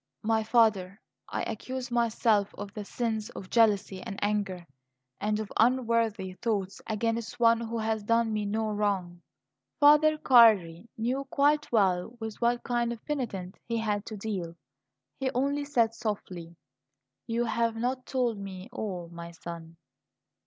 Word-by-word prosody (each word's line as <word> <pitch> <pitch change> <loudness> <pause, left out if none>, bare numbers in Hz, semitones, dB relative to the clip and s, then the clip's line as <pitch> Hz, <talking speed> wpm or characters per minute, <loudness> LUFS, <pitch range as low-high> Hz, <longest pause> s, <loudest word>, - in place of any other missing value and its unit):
"My 220 0 +2
father, 215 -4 +2 0.3
I - - -2
accuse 255 +3 -5
myself 225 -3 +2
of 205 0 -7
the 210 - -5
sins 220 0 -2
of 185 - -9
jealousy 205 -4 +3
and 195 - -6
anger, 200 -4 -1 0.5
and 210 0 0
of 215 -2 -5
unworthy 230 -5 +2
thoughts 200 -5 -2
against 230 +2 -2
one 230 -1 +5
who 230 0 -3
has 220 -1 -1
done 230 +1 +1
me 210 -1 -1
no 215 +1 -1
wrong." 195 -4 -1 0.6
Farther 300 +1 +6
Cardi 220 - +5
knew 250 +5 -1
quite 290 +2 +2
well 195 0 +1
with 220 0 -6
what 240 0 +1
kind 240 -1 0
of 235 - -8
penitent 210 -11 -4
he 230 -1 -1
had 210 -2 -1
to 215 - -6
deal. 190 -5 -4 0.6
He 265 -1 0
only 280 +3 0
said 235 -6 +2
softly: 185 -7 -5 0.7
"You 235 +1 0
have 230 0 0
not 250 +3 -2
told 245 -5 0
me 195 +1 -8
all, 185 -7 -4
my 170 0 -8
son." 165 -1 -9
220 Hz, 145 wpm, -29 LUFS, 200-235 Hz, 0.7 s, Farther